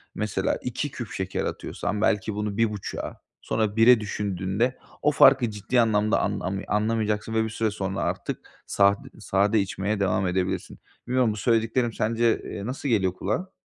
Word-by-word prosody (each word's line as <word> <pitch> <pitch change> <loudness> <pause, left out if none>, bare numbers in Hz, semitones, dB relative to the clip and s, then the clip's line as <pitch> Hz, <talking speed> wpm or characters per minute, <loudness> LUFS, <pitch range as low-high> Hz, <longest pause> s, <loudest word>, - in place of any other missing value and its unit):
mesela 100 -3 -1
2 130 +3 -3
küp 120 -4 -7
şeker 95 0 -3
atıyorsan 105 0 -3
belki 105 -1 +1
bunu 105 0 -3
1,5'a 105 -3 -2 0.2
sonra 110 -2 -1
1'e 115 +1 +7
düşündüğünde 100 +3 -1 0.2
o 150 - +3
farkı 120 -4 +6
ciddi 105 +4 +1
anlamda 110 -1 +2
an - - -1
ami 95 +2 -3
anlamayacaksın 110 0 0
ve 110 0 +2
bir 110 - -2
süre 110 -1 -1
sonra 95 -1 -3
artık - - -4 0.2
sad 100 0 +4 0.2
sade 100 +3 +2
içmeye 100 +2 -2
devam 95 -1 +1
edebilirsin. 90 0 -2 0.3
Bilmiyorum 125 -3 +2
bu - - -7
söylediklerim 115 +1 +1
sence, 115 +1 +1
eee, 100 - -6
nasıl 135 +4 -3
geliyor 95 -6 +2
kulağa? 110 - -3
105 Hz, 160 wpm, -25 LUFS, 100-115 Hz, 0.3 s, 1'e